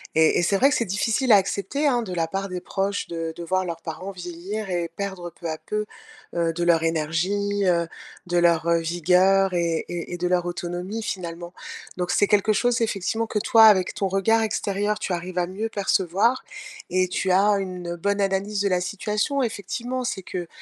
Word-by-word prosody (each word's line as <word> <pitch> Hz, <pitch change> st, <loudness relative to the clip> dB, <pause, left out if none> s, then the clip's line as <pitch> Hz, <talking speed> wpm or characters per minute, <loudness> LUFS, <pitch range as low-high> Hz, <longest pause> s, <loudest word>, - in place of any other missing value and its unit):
Et 160 Hz, 0 st, +4 dB
et 175 Hz, -, +1 dB
c'est 195 Hz, -, +2 dB
vrai 270 Hz, +7 st, +5 dB
que 290 Hz, -, +1 dB
c'est 235 Hz, -, +1 dB
difficile 220 Hz, +6 st, +1 dB
à 205 Hz, -, +9 dB
accepter, 200 Hz, +9 st, -1 dB
hein, 245 Hz, -3 st, +2 dB
de 185 Hz, -5 st, -6 dB
la 165 Hz, -2 st, 0 dB
part 195 Hz, +3 st, -3 dB
des 180 Hz, -2 st, -5 dB
proches 200 Hz, +1 st, -2 dB
de 165 Hz, -1 st, -4 dB
de 170 Hz, -, -7 dB
voir 185 Hz, +2 st, 0 dB
leurs 165 Hz, -2 st, -5 dB
parents 185 Hz, +4 st, -6 dB
vieillir 180 Hz, +4 st, -6 dB
et 175 Hz, -2 st, -1 dB
perdre 190 Hz, -4 st, -5 dB
peu 170 Hz, 0 st, -6 dB
à 155 Hz, -, -3 dB
peu, 210 Hz, +5 st, -3 dB, 0.5 s
heu, 165 Hz, -1 st, +1 dB
de 175 Hz, +1 st, -2 dB
leur 170 Hz, -1 st, +3 dB
énergie, 180 Hz, +6 st, 0 dB
heu, 170 Hz, -2 st, +2 dB, 0.4 s
de 175 Hz, 0 st, 0 dB
leur, 170 Hz, -1 st, +3 dB
heu, 170 Hz, -, +4 dB
vigueur 180 Hz, +3 st, +3 dB
et 170 Hz, -2 st, 0 dB
et 175 Hz, 0 st, -5 dB
et 175 Hz, -, -3 dB
de 180 Hz, -, -1 dB
leur 180 Hz, -1 st, +1 dB
autonomie 175 Hz, +4 st, -4 dB
finalement. 175 Hz, -4 st, -5 dB, 0.5 s
Donc 180 Hz, -1 st, -1 dB
c'est 205 Hz, -, +3 dB
quelque 210 Hz, +1 st, +3 dB
chose 245 Hz, +2 st, +1 dB
effectivement 220 Hz, +1 st, -1 dB
que 215 Hz, -, -1 dB
toi 225 Hz, +2 st, +5 dB
avec 205 Hz, -4 st, +6 dB
ton 195 Hz, -, -1 dB
regard 195 Hz, +4 st, +2 dB
extérieur, 205 Hz, 0 st, -1 dB
tu 185 Hz, -, -2 dB
arrives 180 Hz, +1 st, -5 dB
à 175 Hz, -, +1 dB
mieux 205 Hz, +5 st, -4 dB
percevoir, 200 Hz, +4 st, +1 dB, 0.5 s
et 185 Hz, 0 st, +2 dB
tu 185 Hz, +1 st, -1 dB
as 200 Hz, +2 st, +4 dB
une 180 Hz, -2 st, -5 dB
bonne 200 Hz, +4 st, -1 dB
analyse 195 Hz, +1 st, 0 dB
de 200 Hz, -, +2 dB
la 180 Hz, -1 st, +1 dB
situation 210 Hz, +8 st, -1 dB
effectivement. 240 Hz, +3 st, -3 dB
C'est 215 Hz, -5 st, -3 dB
que, 175 Hz, -1 st, -5 dB
190 Hz, 205 wpm, -24 LUFS, 175-205 Hz, 0.5 s, à